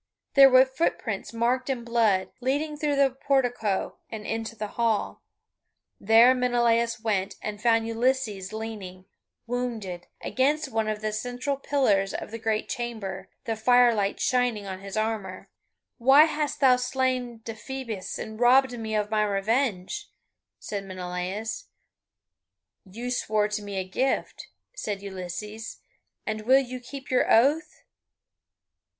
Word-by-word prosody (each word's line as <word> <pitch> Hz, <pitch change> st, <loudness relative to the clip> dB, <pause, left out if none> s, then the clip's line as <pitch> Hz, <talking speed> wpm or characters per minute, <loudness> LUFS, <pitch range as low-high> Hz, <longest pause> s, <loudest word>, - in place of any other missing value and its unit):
There 275 Hz, -1 st, +9 dB
were 260 Hz, 0 st, +7 dB
footprints 260 Hz, -7 st, -2 dB
marked 245 Hz, +3 st, 0 dB
in 255 Hz, -3 st, -2 dB
blood, 225 Hz, -5 st, +2 dB
leading 290 Hz, +4 st, -1 dB
through 295 Hz, -1 st, 0 dB
the 275 Hz, -1 st, +4 dB
portico 245 Hz, -6 st, 0 dB
and 215 Hz, -2 st, -7 dB
into 225 Hz, 0 st, -3 dB
the 210 Hz, -1 st, -5 dB
hall. 230 Hz, -2 st, -1 dB, 0.8 s
There 225 Hz, +4 st, +6 dB
Menelaus 235 Hz, -2 st, +2 dB
went, 200 Hz, -3 st, -1 dB
and 210 Hz, -1 st, -6 dB
found 225 Hz, -1 st, +3 dB
Ulysses 230 Hz, -5 st, -1 dB
leaning, 210 Hz, -4 st, -7 dB, 0.4 s
wounded, 230 Hz, -7 st, -4 dB
against 290 Hz, +4 st, 0 dB
one 220 Hz, -1 st, 0 dB
of 215 Hz, -1 st, -2 dB
the 215 Hz, 0 st, -2 dB
central 245 Hz, +5 st, -2 dB
pillars 235 Hz, -9 st, +1 dB
of -, -, -6 dB
the 230 Hz, -, -6 dB
great 220 Hz, -1 st, -1 dB
chamber, 200 Hz, -6 st, -5 dB, 0.2 s
the 225 Hz, -, -1 dB
firelight 225 Hz, -3 st, +3 dB
shining 245 Hz, -5 st, +1 dB
on 190 Hz, -1 st, -6 dB
his 195 Hz, +2 st, -7 dB
armour. 215 Hz, -2 st, -3 dB, 0.5 s
"Why 270 Hz, +5 st, +7 dB
hast 300 Hz, -2 st, -2 dB
thou 255 Hz, -2 st, +6 dB
slain 250 Hz, -2 st, -1 dB
Deiphobus 225 Hz, -2 st, -5 dB
and 220 Hz, 0 st, -7 dB
robbed 250 Hz, +1 st, +5 dB
me 220 Hz, -1 st, -3 dB
of 210 Hz, 0 st, -1 dB
my 215 Hz, -1 st, +2 dB
revenge?" 205 Hz, 0 st, -1 dB, 0.5 s
said 200 Hz, -2 st, -5 dB
Menelaus. 185 Hz, -, -4 dB, 1.2 s
"You 230 Hz, +6 st, -6 dB
swore 215 Hz, -4 st, +1 dB
to 210 Hz, -, -1 dB
give 210 Hz, -, -8 dB
me 200 Hz, -1 st, -5 dB
a 190 Hz, -, 0 dB
gift," 260 Hz, +8 st, -1 dB, 0.3 s
said 205 Hz, -, -4 dB
Ulysses, 200 Hz, +3 st, -6 dB, 0.5 s
"and 215 Hz, 0 st, -4 dB
will 260 Hz, +1 st, +7 dB
you 255 Hz, -2 st, -2 dB
keep 265 Hz, +2 st, -9 dB
your 255 Hz, -, +2 dB
oath?" 285 Hz, +8 st, +3 dB
225 Hz, 135 wpm, -26 LUFS, 210-255 Hz, 1.2 s, There